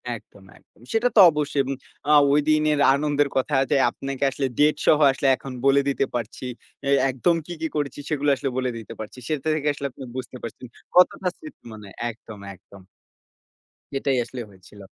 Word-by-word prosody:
একদম, 100 Hz, -3 st, -15 dB
একদম। -, -, -27 dB
সেটা 225 Hz, +2 st, +3 dB
তো -, -, +6 dB
অবশ্যই। 150 Hz, -2 st, 0 dB
উম 135 Hz, -, -1 dB, 0.4 s
আ -, -, +5 dB, 0.2 s
ওই 145 Hz, -, +4 dB
দিনের 155 Hz, -1 st, +3 dB
আনন্দের 145 Hz, 0 st, +1 dB
কথা 135 Hz, +2 st, 0 dB, 0.2 s
যে -, -, +4 dB
আপনাকে 135 Hz, 0 st, -5 dB
আসলে 135 Hz, 0 st, -1 dB
date 150 Hz, +1 st, +4 dB
সহ 150 Hz, -, +6 dB
আসলে 135 Hz, +1 st, -1 dB
এখন 135 Hz, -, -9 dB
বলে 140 Hz, 0 st, +5 dB
দিতে 135 Hz, -, 0 dB
পারছি। 120 Hz, +1 st, -5 dB, 0.4 s
এই 140 Hz, -, +5 dB
একদম 135 Hz, +7 st, +1 dB
কি, 175 Hz, -, -6 dB
কি 160 Hz, -, 0 dB
করেছি, 145 Hz, -2 st, -2 dB
সেগুলো 145 Hz, -1 st, 0 dB
আসলে 135 Hz, +1 st, -3 dB
বলে 130 Hz, -1 st, 0 dB
দিতে 115 Hz, 0 st, -9 dB
পারছি। 110 Hz, +3 st, -8 dB
সেটা 155 Hz, -1 st, -2 dB
থেকে 150 Hz, -1 st, -2 dB
আসলে 140 Hz, 0 st, -4 dB
আপনি 130 Hz, +2 st, -11 dB
বুঝতে 130 Hz, 0 st, -6 dB
পারছেন 115 Hz, +2 st, -8 dB, 0.3 s
কতটা 180 Hz, +1 st, +4 dB
স্মৃতি 310 Hz, -3 st, -13 dB
মানে 105 Hz, -2 st, -11 dB, 0.2 s
একদম, 110 Hz, -2 st, -11 dB, 0.2 s
একদম। 95 Hz, +2 st, -17 dB, 1.1 s
সেটাই 135 Hz, 0 st, 0 dB
আসলে 125 Hz, +1 st, -7 dB
হয়েছিল। 95 Hz, +1 st, -16 dB
140 Hz, 180 wpm, -23 LUFS, 125-150 Hz, 1.1 s, তো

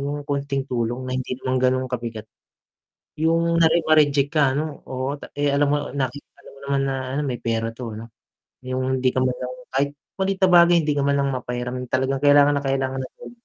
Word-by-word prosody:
'yung 145 Hz, +1 st, -4 dB
konting 140 Hz, -1 st, -1 dB
tulong 120 Hz, +1 st, -2 dB
na 130 Hz, -, -3 dB
hindi 130 Hz, 0 st, -4 dB
naman 130 Hz, 0 st, -1 dB
ganun 130 Hz, 0 st, +2 dB
kabigat. 115 Hz, -3 st, -5 dB, 0.9 s
'Yung 165 Hz, +1 st, +2 dB
kunwari 165 Hz, +1 st, +4 dB
na-reject 145 Hz, -3 st, +3 dB
ka 145 Hz, -4 st, +3 dB
ano, 150 Hz, 0 st, -4 dB
oo 130 Hz, +2 st, -3 dB, 0.2 s
eh, 145 Hz, 0 st, +1 dB
alam 140 Hz, +1 st, +2 dB
mo -, -, +3 dB, 0.2 s
nakita 135 Hz, 0 st, -3 dB, 0.2 s
mo 140 Hz, -, -16 dB
naman 140 Hz, -1 st, +1 dB
na 135 Hz, -, -1 dB, 0.2 s
ano -, -, +1 dB
may 125 Hz, -2 st, -3 dB
pera 115 Hz, -1 st, -1 dB
'to 115 Hz, -2 st, -7 dB
ano, 115 Hz, +1 st, -9 dB, 0.5 s
'yung 130 Hz, +1 st, -1 dB
hindi 130 Hz, 0 st, +3 dB
ka 130 Hz, -, -1 dB
man 125 Hz, -1 st, 0 dB
lang 125 Hz, 0 st, -5 dB, 0.2 s
kahit 140 Hz, +1 st, +1 dB, 0.3 s
maliit 190 Hz, 0 st, 0 dB
na -, -, +2 dB
bagay 175 Hz, 0 st, +7 dB
hindi 150 Hz, -, +1 dB
ka 140 Hz, -, +1 dB
man 140 Hz, 0 st, +2 dB
lang 140 Hz, 0 st, +1 dB
mapahiram 125 Hz, 0 st, -4 dB
talagang 130 Hz, +1 st, 0 dB
kailangan 145 Hz, 0 st, +6 dB
na 140 Hz, -, -2 dB
kailangan 135 Hz, -1 st, -1 dB
agad. 130 Hz, -, -10 dB
135 Hz, 200 wpm, -23 LUFS, 130-145 Hz, 0.9 s, bagay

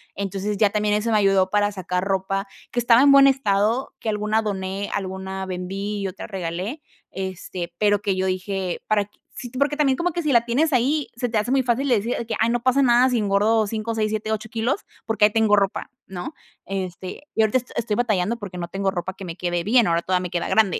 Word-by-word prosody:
Entonces, 200 Hz, +1 st, -3 dB
ya 205 Hz, -1 st, +3 dB
también 210 Hz, 0 st, +1 dB
eso 225 Hz, +2 st, 0 dB
me 215 Hz, -, +4 dB
ayudó 195 Hz, -2 st, +3 dB
para 205 Hz, 0 st, +2 dB
sacar 180 Hz, -2 st, -2 dB
ropa 195 Hz, +1 st, -1 dB, 0.2 s
que 245 Hz, -, -1 dB
estaba 240 Hz, +1 st, +5 dB
en 280 Hz, -, +7 dB
buen 275 Hz, 0 st, +8 dB
estado, 230 Hz, -2 st, +1 dB
que 220 Hz, -, -3 dB
alguna 215 Hz, +1 st, +1 dB
doné, 195 Hz, -1 st, -3 dB
alguna 190 Hz, 0 st, -4 dB
vendí 195 Hz, +3 st, -4 dB
y 195 Hz, -, -1 dB
otra 185 Hz, +1 st, -7 dB
regalé, 190 Hz, -, -4 dB, 0.3 s
este, 185 Hz, -2 st, -5 dB
pero 205 Hz, 0 st, +2 dB
que 200 Hz, -2 st, 0 dB
yo 190 Hz, 0 st, 0 dB
dije: 185 Hz, 0 st, -2 dB
"Para 210 Hz, -1 st, +2 dB
q". 205 Hz, -, -32 dB, 0.2 s
Sí, 245 Hz, -, -7 dB
porque 280 Hz, +4 st, 0 dB
también 275 Hz, -3 st, +2 dB
como 355 Hz, +1 st, 0 dB
que 345 Hz, -, -2 dB
si 305 Hz, -, 0 dB
la 235 Hz, -2 st, +4 dB
tienes 290 Hz, +7 st, +1 dB
ahí 275 Hz, +4 st, +1 dB
se 245 Hz, 0 st, -1 dB
te 225 Hz, -2 st, 0 dB
hace 215 Hz, +4 st, -2 dB
muy 270 Hz, 0 st, +3 dB
fácil 255 Hz, +3 st, 0 dB
de 245 Hz, -, +5 dB
decir 225 Hz, +4 st, -1 dB
que: 220 Hz, -, -2 dB
"Ay, 225 Hz, +1 st, +3 dB
no 240 Hz, 0 st, 0 dB
pasa 260 Hz, +2 st, +3 dB
nada 245 Hz, +1 st, +5 dB
si 245 Hz, -, +1 dB
engordo 215 Hz, +1 st, +2 dB
5, 220 Hz, +2 st, -3 dB
6, 215 Hz, -1 st, 0 dB
7, 215 Hz, 0 st, -2 dB
8 220 Hz, 0 st, -3 dB
kilos 235 Hz, -, -1 dB, 0.2 s
porque 220 Hz, -1 st, +4 dB
ahí 210 Hz, -, +3 dB
tengo 220 Hz, -1 st, +4 dB
ropa", 200 Hz, -1 st, 0 dB, 0.2 s
¿no? 190 Hz, -, -7 dB, 0.3 s
Este, 185 Hz, +4 st, -5 dB
y 225 Hz, -, +2 dB
ahorita 220 Hz, +3 st, +3 dB
est 245 Hz, -, -7 dB
estoy 220 Hz, -3 st, -1 dB
batallando 225 Hz, -2 st, 0 dB
porque 190 Hz, -5 st, -7 dB
no 170 Hz, -, -3 dB
tengo 195 Hz, +1 st, -1 dB
ropa 185 Hz, 0 st, -4 dB
que 195 Hz, -, -8 dB
me 165 Hz, -2 st, -6 dB
quede 175 Hz, -1 st, -1 dB
bien. 230 Hz, +1 st, +4 dB
Ahora 170 Hz, 0 st, +1 dB
toda 185 Hz, -1 st, +1 dB
me 180 Hz, -, -4 dB
queda 175 Hz, 0 st, -2 dB
grande. 210 Hz, -5 st, +2 dB
210 Hz, 235 wpm, -23 LUFS, 190-235 Hz, 0.3 s, buen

